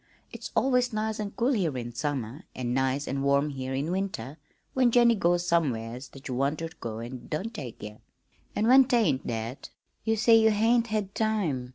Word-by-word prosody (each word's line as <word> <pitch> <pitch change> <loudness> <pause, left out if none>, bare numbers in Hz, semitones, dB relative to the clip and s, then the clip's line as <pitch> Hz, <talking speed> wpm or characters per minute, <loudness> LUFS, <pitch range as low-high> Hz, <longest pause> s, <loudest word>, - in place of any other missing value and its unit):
It's - - -7
always 250 -1 +2
'nice 215 0 -2
an' 210 -1 -2
cool' 240 +4 +1
here 170 - 0
in 120 -1 -5
summer 135 0 -3
an' 120 -1 -2
'nice 135 +2 0
an' 135 +1 -2
warm' 140 +2 +2
here 130 -1 -4
in 145 +5 -2
winter 170 -7 -3 0.3
when 255 -2 +4
Jennie 235 0 +5
goes 175 -4 +1
somewheres 125 -7 0
that 135 - -11
you 130 - -3
want 140 +4 0
ter 165 0 -4
go 110 -2 -5
an' 120 +1 -8
don't 200 +9 -3
take 130 - -8
ye. 105 +1 -8 0.6
An' 215 - +1
when 260 +3 +7
't 255 - +2
ain't 150 - +1
that, 115 +3 -4 0.3
you 225 0 +1
say 225 +1 +5
you 220 0 +6
'hain't 225 +2 +3
had 210 -3 -2
time.' 185 - -1
155 Hz, 200 wpm, -28 LUFS, 130-220 Hz, 0.6 s, when